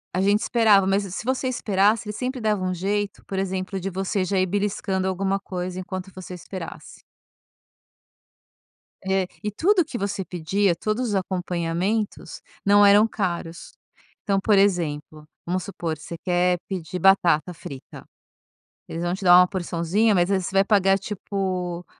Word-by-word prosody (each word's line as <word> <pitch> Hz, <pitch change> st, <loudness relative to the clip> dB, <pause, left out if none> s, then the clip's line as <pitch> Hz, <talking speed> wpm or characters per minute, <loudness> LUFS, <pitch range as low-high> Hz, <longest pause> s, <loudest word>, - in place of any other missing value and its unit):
A 185 Hz, -, +1 dB
gente 200 Hz, +2 st, +3 dB
esperava 215 Hz, -5 st, +4 dB
mas 195 Hz, +1 st, +2 dB
se 195 Hz, -, -7 dB
se 200 Hz, -, -5 dB
você 260 Hz, +1 st, -1 dB
esperasse, 210 Hz, -2 st, +1 dB
eles 210 Hz, -, -5 dB
sempre 255 Hz, +4 st, -3 dB
davam 210 Hz, -5 st, 0 dB
um -, -, -1 dB
jeito, 200 Hz, +3 st, -2 dB
por 195 Hz, -, -5 dB
exemplo, 190 Hz, 0 st, -2 dB
de 195 Hz, -, -3 dB
você 190 Hz, +1 st, -1 dB
já 190 Hz, +1 st, 0 dB
ir 185 Hz, -, +3 dB
beliscando 190 Hz, -1 st, -1 dB
alguma 195 Hz, +1 st, -1 dB
coisa 180 Hz, -1 st, -5 dB
enquanto 185 Hz, 0 st, -6 dB
você 185 Hz, -1 st, -8 dB
esperasse. 180 Hz, -1 st, -9 dB, 2.0 s
É, 190 Hz, -1 st, 0 dB, 0.2 s
e 210 Hz, -, -2 dB
tudo 360 Hz, -, +3 dB
que 275 Hz, -, -6 dB
você 200 Hz, -2 st, -2 dB
pedia, 180 Hz, +3 st, 0 dB
todos 220 Hz, +7 st, -2 dB
os 205 Hz, -, -1 dB
acompanhamentos, 185 Hz, +2 st, -2 dB, 0.2 s
não 205 Hz, +1 st, +6 dB
eram 205 Hz, +2 st, +6 dB
caros. 175 Hz, -6 st, -4 dB, 0.5 s
Então, 195 Hz, -2 st, +1 dB
por 205 Hz, +1 st, +3 dB
exemplo, 155 Hz, -6 st, 0 dB, 0.2 s
vamos 180 Hz, +1 st, -1 dB
supor: 165 Hz, -4 st, -4 dB
você 160 Hz, +3 st, -8 dB
quer 180 Hz, 0 st, +2 dB
pedir 180 Hz, -2 st, -5 dB
batata 180 Hz, -2 st, +3 dB
frita. 140 Hz, -5 st, -10 dB, 0.8 s
Eles 165 Hz, -, -5 dB
vão 175 Hz, 0 st, 0 dB
te 195 Hz, +2 st, -6 dB
dar 175 Hz, -1 st, +8 dB
uma 180 Hz, -, +6 dB
porçãozinha, 185 Hz, +3 st, 0 dB
mas 175 Hz, +1 st, +2 dB
aí 195 Hz, -, +3 dB
você 180 Hz, -, -5 dB
vai 195 Hz, 0 st, +5 dB
pagar 195 Hz, -2 st, +3 dB
tipo, 185 Hz, -3 st, -4 dB
190 Hz, 160 wpm, -24 LUFS, 180-205 Hz, 2.0 s, dar